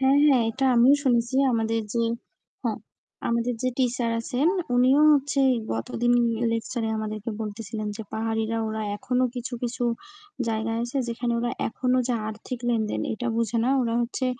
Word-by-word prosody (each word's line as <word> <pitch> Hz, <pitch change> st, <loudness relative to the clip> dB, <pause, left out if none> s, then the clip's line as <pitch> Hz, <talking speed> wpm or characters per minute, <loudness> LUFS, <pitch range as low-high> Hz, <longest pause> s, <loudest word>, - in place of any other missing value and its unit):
হ্যাঁ, 270 Hz, +1 st, +4 dB
হ্যাঁ 265 Hz, -5 st, +5 dB
এটা 270 Hz, +3 st, 0 dB
আমিও 245 Hz, +4 st, +6 dB
শুনেছি, 240 Hz, -2 st, +1 dB, 0.2 s
আমাদের 225 Hz, 0 st, +1 dB
যে 235 Hz, -, +2 dB, 0.6 s
হ্যাঁ। -, -, -1 dB, 0.5 s
আমাদের 235 Hz, +1 st, 0 dB
যে 255 Hz, -, +2 dB
টিচার 245 Hz, -2 st, +1 dB
আছেন 255 Hz, +5 st, 0 dB, 0.3 s
উনিও 260 Hz, +4 st, +5 dB
হচ্ছে 280 Hz, -1 st, +2 dB, 0.3 s
গতদিন 225 Hz, -, 0 dB, 0.4 s
লেকচার 230 Hz, +1 st, -2 dB
এ -, -, -1 dB
আমাদেরকে 215 Hz, +1 st, -4 dB
বলতেছিলেন 215 Hz, 0 st, -4 dB
যে 220 Hz, -, -5 dB
পাহাড়িরা 225 Hz, 0 st, -1 dB
ওরা 220 Hz, 0 st, -3 dB
এখনো 255 Hz, +2 st, 0 dB
কিছু, 245 Hz, 0 st, -4 dB
কিছু 245 Hz, 0 st, -2 dB, 0.6 s
জায়গায় 225 Hz, 0 st, -1 dB
আছে 240 Hz, +3 st, -3 dB
যেখানে 235 Hz, +1 st, -2 dB
ওরা 240 Hz, 0 st, -1 dB, 0.2 s
এখনো 255 Hz, +2 st, 0 dB
যে 245 Hz, -, +1 dB
আর্থিক 220 Hz, +3 st, -6 dB
লেনদেন 220 Hz, -3 st, 0 dB
এটা 235 Hz, +3 st, -4 dB
বুঝে 230 Hz, 0 st, 0 dB
না। 255 Hz, -, +2 dB
ওরা 230 Hz, -1 st, -1 dB
হচ্ছে 255 Hz, +2 st, -2 dB
235 Hz, 160 wpm, -25 LUFS, 225-255 Hz, 0.6 s, আমিও